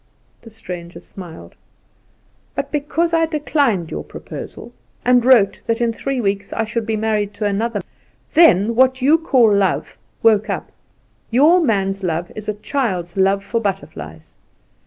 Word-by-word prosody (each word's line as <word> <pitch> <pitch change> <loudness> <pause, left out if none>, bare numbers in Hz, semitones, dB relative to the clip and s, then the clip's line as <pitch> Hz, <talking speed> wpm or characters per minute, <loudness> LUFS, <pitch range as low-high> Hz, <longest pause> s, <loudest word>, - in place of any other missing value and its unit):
The 230 - -13
stranger 180 -6 -8
smiled. 175 -2 -11 1.0
"But - - -3
because 320 +3 -1
I 325 -1 +3
declined 285 - 0
your - - -4
proposal, - - -9 0.3
and 245 -1 +4
wrote 230 -6 +4
that 230 +1 0
in 235 -1 +1
three 275 +3 -3
weeks 200 -2 -2
I 225 - -1
should 225 0 -3
be 220 - 0
married 210 -2 -1
to 215 - -3
another, 205 +1 -1 0.5
then 230 - +5
what 260 +2 +3
you 305 +5 +5
call 250 -9 +4
love 195 -2 0 0.2
woke 220 -1 +4
up. - - -4 0.6
Your 300 +9 +5
man's 195 - 0
love 175 -1 -2
is 215 0 -6
a 210 - -2
child's 205 - -2
love 195 +1 +2
for 230 +3 -2
butterflies. 80 - -5
215 Hz, 150 wpm, -19 LUFS, 195-255 Hz, 1.0 s, then